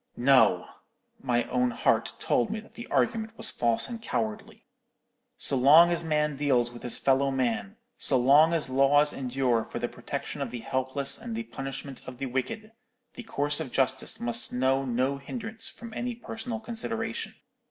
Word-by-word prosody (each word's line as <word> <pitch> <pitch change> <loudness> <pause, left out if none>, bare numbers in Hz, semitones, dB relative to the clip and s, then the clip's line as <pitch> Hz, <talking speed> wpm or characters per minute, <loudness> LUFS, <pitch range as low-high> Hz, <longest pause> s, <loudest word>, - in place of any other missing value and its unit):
"No! 135 +2 +4 0.6
my 120 -2 +1
own 125 0 +2
heart 120 - +1
told 120 - +1
me 220 - -3
the 235 +2 -11
argument 225 -1 0
was 225 - +4
false 115 -1 0
and 235 -2 -7
cowardly. 110 - -4 0.7
So - - +2
long 150 +7 +7
as 170 0 -1
man 150 -2 0
deals 130 -4 +1
with 120 - -11
his 125 - 0
fellow 135 0 +2
man, 115 -7 -1 0.2
so - - +4
long 140 +6 +6
as 165 -2 +1
laws 140 +3 +4
endure 125 -3 0
for - - -7
the - - -1
protection - - -6
of - - -2
the 120 - -6
helpless 130 +1 -1
and 235 -1 -6
the 230 - -3
punishment 135 - -7
of 130 -1 -8
the 135 - -3
wicked, 130 - -3 0.4
the - - -8
course 145 -10 0
of 150 -6 -5
justice 135 +10 0
must 235 +1 -3
know 130 +2 +1
no 130 +3 0
hindrance 225 - -5
from 230 -1 -11
any 245 +1 -3
personal 225 0 -6
consideration. 225 0 -4
140 Hz, 170 wpm, -28 LUFS, -, 0.7 s, long